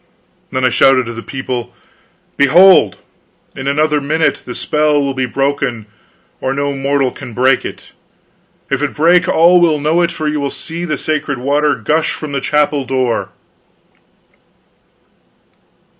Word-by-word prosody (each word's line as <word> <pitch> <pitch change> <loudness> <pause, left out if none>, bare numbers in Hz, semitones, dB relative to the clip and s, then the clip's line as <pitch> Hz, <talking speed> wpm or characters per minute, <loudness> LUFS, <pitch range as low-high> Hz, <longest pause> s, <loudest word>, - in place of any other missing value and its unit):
Then 130 0 0
I - - +4
shouted 130 +1 +3
to 120 - -6
the 115 - -7
people: 125 -2 -5 0.6
"Behold, 175 +7 +5 0.6
in 135 0 -6
another 150 +1 +1
minute 155 +3 0
the 125 - -7
spell 150 -1 +1
will 140 -1 -1
be 130 -1 -2
broken, 135 -3 -2 0.5
or 130 +1 -2
no 140 0 -1
mortal 135 -1 0
can 130 -5 -10
break 130 +2 +2
it. - - -9 0.8
If 135 0 0
it 145 - -2
break, 170 +3 +3
all 175 0 +4
will 160 -3 +2
know 155 +4 +1
it, 170 -1 +1
for 155 -2 -4
you 150 0 -1
will 140 -1 -2
see 165 +4 -7
the 155 -3 -2
sacred 150 -3 -2
water 145 +3 +1
gush 150 +8 -1
from 155 -2 -7
the 140 -1 -2
chapel 150 -1 0
door!" 130 -2 -1
140 Hz, 150 wpm, -15 LUFS, 130-155 Hz, 0.8 s, Behold